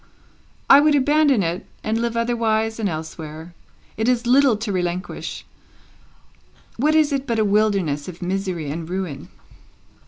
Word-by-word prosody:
" - - -35
I 275 - +8
would 300 0 +4
abandon 285 -4 +3
it, 170 +2 -3 0.2
and 225 +1 -1
live 235 0 -2
otherwise 225 -1 0
and 210 -3 0
elsewhere. 160 +1 -7 0.4
It 220 +3 +1
is 245 -1 +1
little 255 -1 +4
to 215 0 -4
relinquish. 180 0 -4 1.3
What 300 +6 +1
is 310 -1 +3
it 275 -1 -2
but 230 -2 0
a 215 - +2
wilderness 195 -8 +1
of 180 -2 -9
misery 180 -4 -3
and 165 +2 -6
ruin!" 180 -7 -5
215 Hz, 150 wpm, -21 LUFS, 175-240 Hz, 1.3 s, I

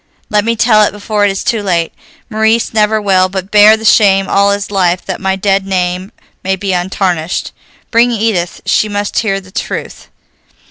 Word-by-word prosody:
Let 210 -1 +2
me 230 +2 0
tell 215 -1 +3
it 210 - +2
before 210 0 -1
it - - +2
is 195 - -4
too 225 -2 -1
late! 175 -4 -1 0.3
Maurice 220 +1 0
never 215 0 +2
will, 190 -3 +2
but 190 0 -6
bear 210 +1 +6
the 220 - -8
shame 195 -3 +4
all 200 0 +2
his 200 0 -2
life 185 -2 0
that - - -5
my 190 0 0
dead 195 0 0
name 185 +1 -2 0.3
may 190 0 0
be 190 0 -3
untarnished. 180 -2 -2 0.4
Bring 235 +1 +3
Edith; 215 -6 -2
she 215 - +1
must 205 0 -2
hear 195 -4 -1
the 185 -1 -16
truth." 230 - -6
200 Hz, 185 wpm, -12 LUFS, 190-215 Hz, 0.4 s, bear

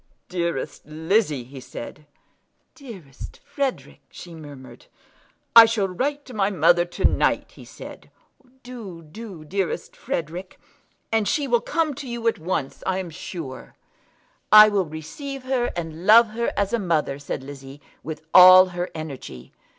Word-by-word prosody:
"Dearest 170 -6 -3
Lizzie!" 160 - 0
he 135 +3 -11
said. 130 +3 -10 0.7
"Dearest 190 - -11
Frederic!" 275 -3 -4
she 175 - -11
murmured. 140 -6 -12 0.7
"I 230 -1 +12
shall 225 -3 0
write 285 +10 -3
to 255 - -11
my 200 -3 +1
mother 175 -1 +3
to 175 - -4
night," - - +1
he - - -14
said. - - -12 0.5
"Do, 215 -9 -9
do; 185 -1 -10
dear 190 +2 -1
Frederic." 170 +4 -6 0.5
"And 220 -2 +1
she 290 -2 0
will 240 -2 +2
come 320 -3 -1
to 275 0 -8
you 235 -1 -4
at 230 - +1
once, 160 -5 -3
I 190 0 0
am 185 -3 -5
sure." 150 -5 -8 0.8
"I 215 0 +10
will 200 -3 0
receive 250 - -8
her 255 -2 0
and 165 +1 -6
love 225 +1 +7
her 235 +2 -2
as 200 +2 0
a 235 - +1
mother," 155 -7 -1
said 140 -2 -5
Lizzie, 135 0 -11 0.2
with 155 0 -7
all 185 0 +9
her 175 0 -4
energy. 135 - -8
180 Hz, 150 wpm, -23 LUFS, 155-225 Hz, 0.8 s, I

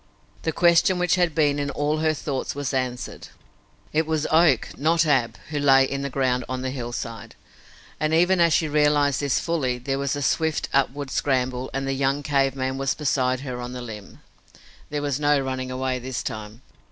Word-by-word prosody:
The 160 - -1
question 175 +3 +4
which 180 0 +1
had 175 -4 +2
been 145 -2 +2
in 145 0 -2
all 145 +2 -1
her 155 0 +1
thoughts 135 -2 -3
was 145 -2 -3
answered! 130 -2 -3 0.7
It 155 +1 +1
was 155 -1 0
Oak, 155 -5 +4
not 165 +3 +2
Ab, 130 -6 +1
who 150 - -1
lay 135 -2 +6
in 140 +1 -3
the 140 - -3
ground 130 -2 0
on 130 0 -3
the 130 - -2
hillside. 120 -3 -6 0.6
And, 155 0 0
even 175 +3 +3
as 170 -1 +4
she 160 - +2
realized 150 -2 +2
this 140 -2 +1
fully, 140 -7 -1
there 135 +2 -3
was 140 +1 -1
a 145 - -3
swift 160 +2 0
upward 140 0 0
scramble 130 -1 0
and 135 0 -3
the 135 - 0
young 135 +1 0
cave 135 -2 +1
man 130 0 -2
was 135 -1 0
beside 130 -3 0
her 125 -3 -5
on 120 +1 -6
the 125 - -6
limb. 105 -4 -10 0.7
There 145 0 -3
was 145 -1 -1
no 145 -1 +3
running 130 -1 -3
away 130 0 -2
this 125 -3 -4
time. 110 +3 -7
140 Hz, 195 wpm, -24 LUFS, 130-150 Hz, 0.7 s, lay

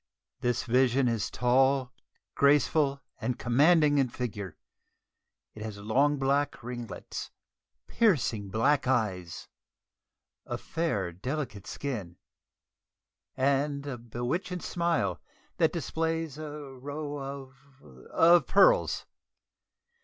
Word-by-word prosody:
This 120 -1 0
vision 125 +2 +3
is 115 -3 0
tall, 130 +1 +2 0.4
graceful, 140 0 +3 0.2
and 125 - -2
commanding 145 +4 +4
in 130 -2 +2
figure. 105 -7 -5 1.0
It 110 - -11
has 110 -2 -6
long 135 +8 +2
black 140 -1 0
ringlets, 120 -3 -6 0.6
piercing 120 - +1
black 135 +8 +2
eyes, 100 -9 -1 1.0
a - - -3
fair 155 - -2
delicate 125 - -5
skin, 105 -12 -5 1.2
and 140 +1 +1
a 130 -4 -5
bewitching 120 - -3
smile 170 -1 -1 0.4
that 160 -2 +3
displays 160 -2 -2
a 155 -1 -5
row 145 +1 -6
of 135 0 -10 0.3
of 170 +1 +5
"pearls!" - - +4
135 Hz, 95 wpm, -29 LUFS, 120-150 Hz, 1.2 s, of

